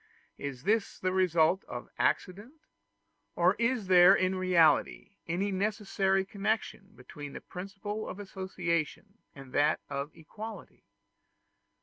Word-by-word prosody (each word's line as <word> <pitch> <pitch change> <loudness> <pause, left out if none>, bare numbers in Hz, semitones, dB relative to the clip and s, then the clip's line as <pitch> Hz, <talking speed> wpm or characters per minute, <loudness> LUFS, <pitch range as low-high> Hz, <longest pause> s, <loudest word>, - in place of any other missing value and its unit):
Is 140 -2 -6
this 215 +2 +1
the 185 - -1
result 180 -1 +3
of 120 0 -7
accident? 205 - -1 0.8
or 175 +2 +4
is 235 -2 +1
there 185 +1 +7
in 185 -1 +1
reality 180 -1 +3 0.2
any 185 +4 -1
necessary 195 -1 0
connection 200 0 -3
between 140 +3 -10
the - - -6
principle 200 +3 -6
of 195 - -7
association 190 0 -3 0.2
and 135 -2 -12
that 150 +2 +3
of 140 +1 -3
equality? 215 +8 -10
185 Hz, 115 wpm, -30 LUFS, 165-205 Hz, 0.8 s, there